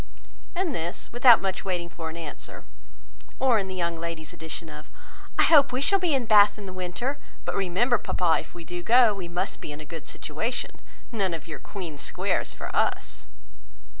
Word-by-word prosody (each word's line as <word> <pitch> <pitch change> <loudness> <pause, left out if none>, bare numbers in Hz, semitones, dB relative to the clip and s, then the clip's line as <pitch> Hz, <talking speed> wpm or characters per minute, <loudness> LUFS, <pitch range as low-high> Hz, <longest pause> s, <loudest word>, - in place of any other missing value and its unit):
and 350 -4 0
this, 170 -5 -4
without 240 -2 +7
much 190 -1 -1
waiting 180 -3 -2
for 165 -1 -6
an 160 - -8
answer; 145 -8 -8 0.7
or 250 -4 +4
in 195 - -3
the 185 - -5
young 170 -2 -1
ladies' 165 -2 -6
addition 160 +1 -7
of, 150 0 -10 0.5
"I - - +6
hope 290 -4 +6
we 250 - -1
shall 390 +8 +3
be 345 -6 +2
in 260 -3 0
Bath 210 -1 +6
in 205 - -8
the 185 - -7
winter; 185 +10 -3 0.3
but - - -2
remember, 200 +6 +2
papa, 175 -3 +2
if - - -12
we 170 - -8
do 175 +1 -6
go, 235 +2 +6
we 190 -3 -6
must 180 +3 -3
be - - -6
in 145 - -8
a 155 - -9
good 160 +1 -8
situation: 220 - -4 0.3
none 195 -7 0
of 160 - -9
your 165 - -6
Queen 170 -8 -7
Squares - - -1
for - - -7
us!" 105 - -1
185 Hz, 195 wpm, -26 LUFS, 165-235 Hz, 0.7 s, without